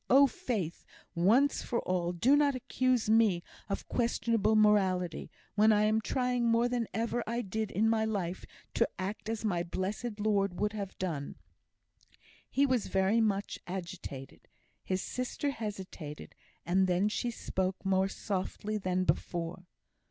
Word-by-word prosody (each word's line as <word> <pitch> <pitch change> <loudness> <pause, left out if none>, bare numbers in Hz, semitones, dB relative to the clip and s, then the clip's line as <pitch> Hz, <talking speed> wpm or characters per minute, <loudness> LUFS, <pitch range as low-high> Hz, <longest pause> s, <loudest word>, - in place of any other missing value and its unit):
Oh, 275 +2 +8
Faith! 235 - -3 0.3
once 230 +12 +3
for 235 - -1
all, 175 -1 0
do 225 +11 +4
not 290 -2 +3
accuse 255 -1 0
me 215 -5 +4 0.3
of 195 - -3
questionable 230 -2 +1
morality, 190 -5 +2 0.2
when 215 +1 +5
I 210 0 +4
am 215 +1 +3
trying 250 0 0
more 230 +1 +3
than 245 -2 -1
ever 230 +1 -1
I 235 +2 -1
did 215 +2 -2
in 215 +3 +1
my 225 -1 +2
life 195 -5 -2 0.3
to - - +2
act 200 +3 -4
as 225 -1 -3
my 175 -5 +1
blessed 205 +6 -3
Lord 200 -3 +1
would 210 0 0
have 200 -3 -5
done." 160 -7 -3 1.1
He 280 - +3
was 255 -5 +1
very 195 +4 +2
much 205 -2 0
agitated. 170 -7 -7 0.4
His 185 0 -1
sister 255 +3 -2
hesitated, 190 - -7 0.3
and 185 +2 +3
then 180 +3 +2
she 225 +3 -1
spoke 190 -4 -3
more 190 0 +3
softly 205 +2 -3
than 185 -1 0
before. 175 0 -2
210 Hz, 145 wpm, -31 LUFS, 185-230 Hz, 1.1 s, Oh